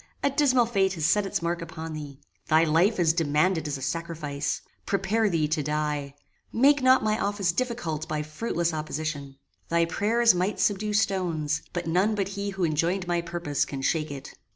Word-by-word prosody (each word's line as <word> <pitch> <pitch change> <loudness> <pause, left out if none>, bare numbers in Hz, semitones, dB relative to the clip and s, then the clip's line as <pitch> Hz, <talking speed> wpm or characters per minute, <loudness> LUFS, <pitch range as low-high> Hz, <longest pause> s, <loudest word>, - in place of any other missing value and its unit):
a 280 - +3
dismal 260 -4 +3
fate 195 -5 +1
has 160 -5 -2
set 200 +4 +3
its 180 - -2
mark 170 0 -1
upon 160 -1 -6
thee. 145 -3 -8 0.3
Thy 160 +1 +5
life 170 +7 +3
is 165 -2 +4
demanded 160 +1 +1
as 145 -1 -2
a 135 - -8
sacrifice. 155 -2 -3 0.2
Prepare 205 +3 +1
thee 160 -4 +1
to 155 0 0
die. 150 -1 -2 0.4
Make 280 +4 +4
not 260 -1 +5
my 215 0 +1
office 200 -3 0
difficult 170 -8 -2
by 155 -1 -1
fruitless 170 +1 -2
opposition. 155 -2 -4 0.3
Thy 170 0 +3
prayers 230 +6 +3
might 180 +4 -1
subdue 210 +1 +1
stones; 170 -7 0
but 175 -1 -3
none 185 +6 +2
but 195 -2 -1
he 200 0 -4
who 195 -2 -3
enjoined 170 +4 0
my 175 -1 +1
purpose 170 -4 -2
can 135 -2 -5
shake 155 +2 0
it." 140 -2 -8
170 Hz, 180 wpm, -26 LUFS, 155-200 Hz, 0.4 s, Thy